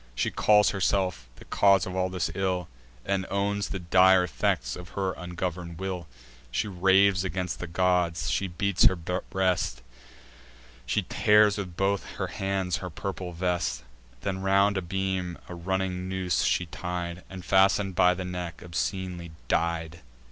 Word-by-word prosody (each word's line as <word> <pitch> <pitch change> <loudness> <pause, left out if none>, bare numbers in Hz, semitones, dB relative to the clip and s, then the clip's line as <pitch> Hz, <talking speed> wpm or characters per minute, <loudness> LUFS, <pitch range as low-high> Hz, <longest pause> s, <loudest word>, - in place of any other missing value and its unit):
She - - 0
calls 105 -1 +4
herself 90 -9 0
the - - -14
cause 100 -2 +4
of 95 - -5
all 95 0 0
this 90 -3 -2
ill, 90 -2 -1 0.4
And 95 -1 -1
owns 100 +1 -1
the 95 - -3
dire 95 +1 +5
effects - - -1
of 90 +1 -11
her 95 -1 0
ungovern'd 90 -1 -5
will; 90 -2 -4 0.4
She 85 - -1
raves 95 0 +4
against 90 -1 -3
the 85 - -5
gods; 90 -1 +1
she 95 - 0
beats 100 +2 +1
her 95 - +6
breast; 90 -5 -1 1.0
She - - +1
tears 105 -1 +4
with 90 -3 -6
both 100 0 +1
her - - -2
hands 95 -3 -2
her 90 - -6
purple 90 +1 -5
vest: 90 -5 -1 0.4
Then 95 -1 -2
round 100 +1 +3
a 95 - 0
beam 95 -1 -2
a - - -7
running 95 +1 -2
noose 95 -3 0
she 90 - +1
tied, 90 0 -5
And, 95 -1 -9
fasten'd 95 0 +3
by 90 0 +4
the 95 0 -5
neck, 90 -2 -5
obscenely 90 0 -3 0.2
died. 85 0 -1
90 Hz, 155 wpm, -27 LUFS, 85-95 Hz, 1.0 s, her